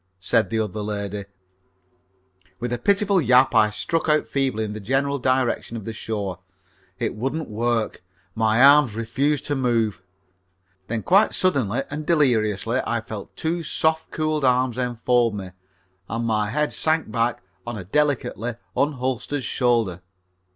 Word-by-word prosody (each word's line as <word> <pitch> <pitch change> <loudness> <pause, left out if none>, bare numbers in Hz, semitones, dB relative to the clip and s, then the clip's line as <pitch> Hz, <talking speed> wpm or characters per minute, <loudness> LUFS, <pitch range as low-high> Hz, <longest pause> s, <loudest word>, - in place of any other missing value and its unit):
said 100 +4 +1
the 115 - -1
other 110 -1 -2
lady. 100 -1 -4 1.3
With 120 +2 -3
a 120 - -2
pitiful 200 - +3
yap 130 0 +4
I 110 -2 +5
struck 160 +9 -1
out 150 0 +3
feebly 135 -5 -1
in 105 -1 -4
the 110 - -6
general 135 +6 0
direction 130 -2 0
of 110 - -8
the 115 - -4
shore. 100 -5 -4 0.6
It - - -2
wouldn't 135 +8 -3
work. 115 0 -1 0.3
My 110 +2 +3
arms 140 -5 +6
refused 135 +6 0
to 145 - -1
move. 115 -6 0 0.9
Then 115 -1 -3
quite 195 +4 +4
suddenly 135 - +1
and 150 +1 -4
deliriously 120 - +1
I 120 - 0
felt 110 -2 -8
two 170 +2 -2
soft, 160 0 0
cool 155 -2 -1
arms 125 -1 +2
enfold 120 -2 +1
me, 95 -2 -6 0.6
and 115 +2 -2
my 105 -2 0
head 150 +6 0
sank 160 -6 0
back 115 -1 0 0.2
on 120 -2 -4
a 95 - -6
delicately 125 0 -1 0.2
unholstered 130 0 -1
shoulder. 115 -10 +1
120 Hz, 145 wpm, -23 LUFS, 110-145 Hz, 1.3 s, arms